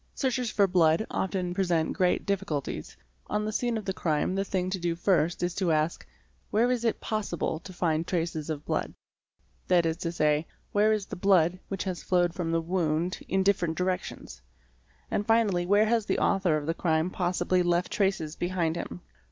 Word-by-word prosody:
Searches 255 Hz, -3 st, 0 dB
for 205 Hz, -1 st, +3 dB
blood 175 Hz, 0 st, +3 dB
often 185 Hz, -2 st, -1 dB
present 175 Hz, -4 st, +1 dB
great 180 Hz, -1 st, +1 dB
difficulties. 195 Hz, -8 st, -3 dB, 0.3 s
On 210 Hz, 0 st, -1 dB
the 215 Hz, -, -2 dB
scene 235 Hz, +1 st, 0 dB
of 215 Hz, -, -6 dB
the 190 Hz, -, -1 dB
crime 160 Hz, 0 st, 0 dB
the 195 Hz, +1 st, 0 dB
thing 185 Hz, -1 st, -2 dB
to 190 Hz, -, -2 dB
do 170 Hz, -1 st, -1 dB
first 170 Hz, -2 st, +1 dB
is 175 Hz, 0 st, 0 dB
to 180 Hz, -3 st, 0 dB
ask: 155 Hz, +1 st, 0 dB, 0.4 s
where 235 Hz, +4 st, +2 dB
is 245 Hz, -2 st, 0 dB
it 230 Hz, -, 0 dB
possible 205 Hz, -7 st, -2 dB
to 185 Hz, -, -11 dB
find 165 Hz, -2 st, 0 dB
traces 165 Hz, -3 st, -2 dB
of 150 Hz, -1 st, -4 dB
blood? -, -, -2 dB, 0.7 s
that 175 Hz, -2 st, +4 dB
is 160 Hz, 0 st, 0 dB
to 170 Hz, -1 st, -3 dB
say, 150 Hz, -1 st, +1 dB, 0.2 s
where 210 Hz, +1 st, +3 dB
is 210 Hz, -2 st, 0 dB
the -, -, -7 dB
blood 180 Hz, -2 st, +3 dB
which 195 Hz, -1 st, -3 dB
has 185 Hz, -3 st, -4 dB
flowed 175 Hz, -2 st, +2 dB
from 175 Hz, -3 st, -2 dB
the 165 Hz, 0 st, +1 dB
wound 170 Hz, 0 st, -1 dB
in 190 Hz, 0 st, +1 dB
different 180 Hz, -5 st, +1 dB
directions? 185 Hz, -, -3 dB, 0.7 s
and 205 Hz, -, -1 dB
finally 210 Hz, -6 st, +2 dB
where 205 Hz, +3 st, +5 dB
has 225 Hz, -1 st, +1 dB
the -, -, +1 dB
author 190 Hz, -6 st, +2 dB
of 150 Hz, -, -4 dB
the 165 Hz, -, 0 dB
crime 165 Hz, 0 st, 0 dB
possibly 180 Hz, 0 st, +1 dB
left 175 Hz, 0 st, +1 dB
traces 190 Hz, -7 st, 0 dB
behind 175 Hz, -2 st, -1 dB
him? 175 Hz, -, -6 dB
180 Hz, 190 wpm, -28 LUFS, 165-195 Hz, 0.7 s, where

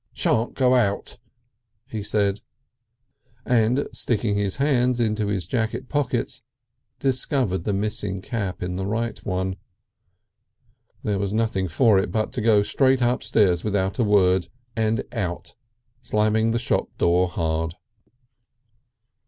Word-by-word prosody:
"Shan't 115 Hz, +2 st, 0 dB
go 130 Hz, -1 st, +3 dB
out!" 105 Hz, -6 st, 0 dB, 0.7 s
he 110 Hz, -4 st, -5 dB
said, 100 Hz, -1 st, 0 dB, 1.0 s
and 120 Hz, +2 st, +2 dB
sticking 110 Hz, -3 st, 0 dB
his 100 Hz, -2 st, -1 dB
hands 125 Hz, -3 st, +2 dB
into 110 Hz, -2 st, 0 dB
his 100 Hz, -3 st, -1 dB
jacket 115 Hz, 0 st, -2 dB
pockets 145 Hz, -4 st, -1 dB, 0.6 s
discovered 130 Hz, -, 0 dB
the 105 Hz, -, 0 dB
missing 100 Hz, -1 st, -1 dB
cap 100 Hz, -3 st, -4 dB
in 90 Hz, 0 st, -3 dB
the 95 Hz, 0 st, -2 dB
right 115 Hz, +3 st, -2 dB
one. 95 Hz, 0 st, -2 dB, 1.5 s
There 105 Hz, -2 st, 0 dB
was 100 Hz, 0 st, -2 dB
nothing 110 Hz, -4 st, 0 dB
for 105 Hz, -, +4 dB
it 95 Hz, -, -1 dB
but 110 Hz, +1 st, -1 dB
to 130 Hz, -, -2 dB
go 105 Hz, -2 st, +4 dB
straight 130 Hz, +4 st, +2 dB
upstairs 105 Hz, -7 st, +2 dB
without 95 Hz, -1 st, -1 dB
a -, -, +4 dB
word, 95 Hz, -4 st, +3 dB, 0.3 s
and 110 Hz, 0 st, 0 dB
out, 90 Hz, -2 st, -4 dB, 0.5 s
slamming 110 Hz, +1 st, +1 dB
the 115 Hz, -, +1 dB
shop 115 Hz, -, 0 dB
door 90 Hz, +2 st, +3 dB
hard. 80 Hz, -1 st, -2 dB
105 Hz, 130 wpm, -24 LUFS, 95-115 Hz, 1.5 s, for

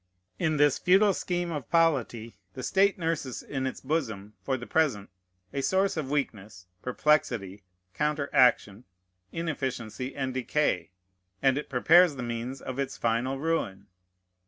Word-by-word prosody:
In 160 Hz, -3 st, +1 dB
this 145 Hz, -2 st, +4 dB
futile 195 Hz, +3 st, +4 dB
scheme 175 Hz, -2 st, -2 dB
of 145 Hz, -6 st, -5 dB
polity, 130 Hz, -9 st, +1 dB, 0.2 s
the 130 Hz, -, -6 dB
state 195 Hz, +5 st, +3 dB
nurses 160 Hz, -, -3 dB
in 135 Hz, -1 st, -3 dB
its 130 Hz, -, -6 dB
bosom, 110 Hz, -9 st, -3 dB
for 135 Hz, -1 st, -1 dB
the 120 Hz, -, -8 dB
present, 125 Hz, -13 st, 0 dB, 0.4 s
a 140 Hz, -, -1 dB
source 190 Hz, +6 st, +1 dB
of 155 Hz, -5 st, -3 dB
weakness, 105 Hz, -10 st, -3 dB, 0.2 s
perplexity, 120 Hz, -8 st, 0 dB, 0.3 s
counteraction, 130 Hz, -7 st, +2 dB, 0.5 s
inefficiency, 130 Hz, -6 st, -4 dB
and 130 Hz, -2 st, -2 dB
decay; 130 Hz, -, 0 dB, 0.5 s
and 135 Hz, -1 st, +4 dB
it 145 Hz, -, -4 dB
prepares 160 Hz, +5 st, +5 dB
the 125 Hz, -, -5 dB
means 120 Hz, +3 st, -4 dB
of 130 Hz, +1 st, -5 dB
its 140 Hz, -, -3 dB
final 120 Hz, +4 st, 0 dB
ruin. 145 Hz, -11 st, -2 dB
135 Hz, 135 wpm, -28 LUFS, 120-160 Hz, 0.5 s, prepares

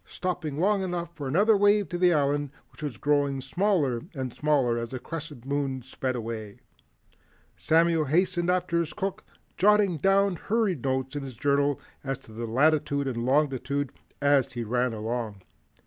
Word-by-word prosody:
Stopping 175 Hz, -5 st, -3 dB
long 200 Hz, +2 st, +2 dB
enough 175 Hz, -2 st, -3 dB
for 145 Hz, -3 st, -5 dB
another 205 Hz, +10 st, +4 dB
wave 205 Hz, 0 st, +4 dB
to 175 Hz, -, -3 dB
the 180 Hz, -1 st, +5 dB
Island, 145 Hz, -2 st, +1 dB, 0.2 s
which 130 Hz, -, -16 dB
was 145 Hz, -7 st, -4 dB
growing 145 Hz, -1 st, +1 dB
smaller 140 Hz, -, 0 dB
and 130 Hz, -3 st, -4 dB
smaller 135 Hz, -6 st, +1 dB
as 115 Hz, 0 st, -4 dB
the 130 Hz, -, -5 dB
Crescent 150 Hz, -3 st, -7 dB
Moon 135 Hz, -2 st, -2 dB
sped 130 Hz, 0 st, -3 dB
away, 110 Hz, -3 st, -5 dB, 1.0 s
Samuel 165 Hz, -1 st, +3 dB
hastened 175 Hz, +4 st, +1 dB
after 180 Hz, -2 st, +1 dB
his 165 Hz, -2 st, -2 dB
cook, 195 Hz, 0 st, -3 dB, 0.3 s
jotting 205 Hz, -3 st, +4 dB
down 195 Hz, +2 st, +3 dB
hurried 205 Hz, -, 0 dB
notes 130 Hz, +1 st, -1 dB
in 145 Hz, -, -2 dB
his 130 Hz, -4 st, -8 dB
journal 140 Hz, +1 st, +1 dB, 0.2 s
as 135 Hz, -1 st, -2 dB
to 110 Hz, -, -16 dB
latitude 140 Hz, +5 st, +1 dB
and 120 Hz, -2 st, -2 dB
longitude 140 Hz, -1 st, +1 dB, 0.3 s
as 140 Hz, -2 st, +3 dB
he 120 Hz, -2 st, -3 dB
ran 125 Hz, +2 st, 0 dB
along. 110 Hz, -2 st, -4 dB
145 Hz, 160 wpm, -27 LUFS, 130-175 Hz, 1.0 s, the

